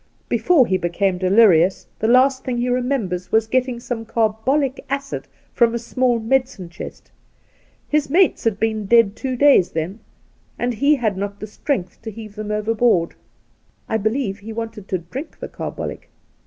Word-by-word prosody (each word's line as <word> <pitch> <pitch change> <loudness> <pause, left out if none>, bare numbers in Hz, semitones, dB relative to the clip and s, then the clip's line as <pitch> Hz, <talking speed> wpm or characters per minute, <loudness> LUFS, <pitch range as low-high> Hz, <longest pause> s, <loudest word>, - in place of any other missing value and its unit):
Before 330 -8 +4
he 185 -3 0
became 180 +2 0
delirious, 185 -2 +4
the 220 - 0
last 260 +2 +4
thing 250 -2 -2
he 245 +1 0
remembers 245 -8 -1
was 220 0 +3
getting 255 +1 0
some 235 -1 -4
carbolie 230 +6 0 0.2
acid 275 0 -4 0.3
from 235 -1 +3
a - - +1
small 245 +1 0
medicine 240 -5 -1
chest. 175 - -10 0.8
His 300 -1 +1
mates 360 +5 +3
had 220 -3 0
been 220 -2 -1
dead 230 -2 +4
two 260 -2 -3
days 275 -8 +5
then, 165 +7 -3 0.6
and 245 0 -1
he 280 +6 +3
had 220 -7 -1
not 200 +1 -4
the - - -5
strength 210 - -3
to 225 - -6
heave 215 -1 -9
them 210 0 -6
overboard. 210 -4 +1 0.7
I 220 - 0
believe 220 -1 -1
he, 215 +2 -8
wanted 225 -3 -6
to 185 - -1
drink 250 - -8
the - - -5
carbolic. - - -6
225 Hz, 165 wpm, -21 LUFS, 200-255 Hz, 0.8 s, days